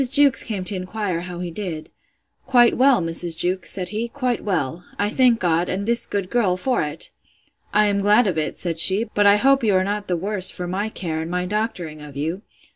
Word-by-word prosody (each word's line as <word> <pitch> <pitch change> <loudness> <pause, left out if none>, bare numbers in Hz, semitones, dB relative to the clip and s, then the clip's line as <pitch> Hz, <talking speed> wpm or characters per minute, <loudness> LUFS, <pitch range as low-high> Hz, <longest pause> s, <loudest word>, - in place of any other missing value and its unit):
Jewkes 280 0 +5
came 205 -4 -4
to 185 +2 0
inquire 185 -1 -3
how 180 0 -7
he 175 -1 -5
did. 165 -4 -6 0.6
Quite 240 -2 +4
well, 260 -4 +4
Mrs. 165 0 +1
Jewkes, 180 +2 0
said 180 -2 -3
he; 215 +4 -3
quite 255 -3 -2
well: 170 -4 -2
I 205 +1 0
thank 245 -2 +3
God, 170 0 0
and 195 +2 -2
this 235 +1 +1
good 195 -3 -3
girl, 205 -7 +1
for 250 +6 0
it!—I 175 +7 -4
am 200 -1 +1
glad 210 +4 +4
of 190 -5 -1
it, 155 -1 -3
said 165 -2 -3
she; 190 +6 +6
but 205 0 +3
I 200 - +7
hope 270 +4 +3
you 210 -4 +2
are 185 - +3
not 205 +1 -3
the 180 - -1
worse 190 +1 +1
for 180 - -4
my 195 +4 -3
care, 160 -6 -4
and 160 - -6
my 180 +1 -2
doctoring 180 -7 -4
of 145 -2 -11
you! 165 +7 -3
190 Hz, 215 wpm, -21 LUFS, 175-215 Hz, 0.6 s, I